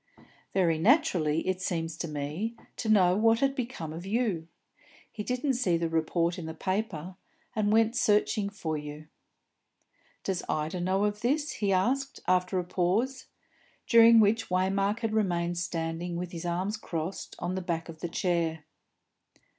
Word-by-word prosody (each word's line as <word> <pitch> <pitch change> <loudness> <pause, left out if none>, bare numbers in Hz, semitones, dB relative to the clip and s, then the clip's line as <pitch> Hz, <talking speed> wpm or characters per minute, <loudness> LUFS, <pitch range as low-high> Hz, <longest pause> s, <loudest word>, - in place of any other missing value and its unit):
"Very 170 -4 +2
naturally, 180 - +3
it 185 0 -1
seems 165 -3 -2
to 170 - -3
me, 155 +10 -3 0.2
to 225 - -3
know 185 -4 +5
what 225 +2 +4
had 275 0 +2
become 235 - -4
of 165 +2 -7
you. 195 -5 -1 0.6
He 215 - -6
didn't 250 +5 0
see 230 -9 +1
the 165 0 -1
report 170 +2 0
in 160 - -6
the 160 - -6
paper, 185 -2 -3 0.4
and 210 -1 +1
went 225 +2 +3
searching 210 -2 +2
for 165 -6 -4
you." 150 0 -7 1.2
"Does 190 -2 -1
Ida 155 +4 -1
know 190 +3 +1
of 210 0 -2
this?" 290 +5 +1
he 205 -2 -1
asked, 265 +9 +1
after 180 +1 +2
a 180 - +1
pause, 195 +10 0 0.6
during 230 -1 +7
which 220 +2 +3
Waymark 195 +4 +1
had 225 -2 -1
remained 175 -5 0
standing 170 0 -3
with 175 0 -4
his 170 0 -5
arms 185 +5 -1
crossed 170 -3 -5
on 175 - -3
the 190 - -2
back 170 -2 -3
of 165 -2 -10
the 175 - -4
chair. 165 -3 -1
185 Hz, 160 wpm, -29 LUFS, 165-220 Hz, 1.2 s, during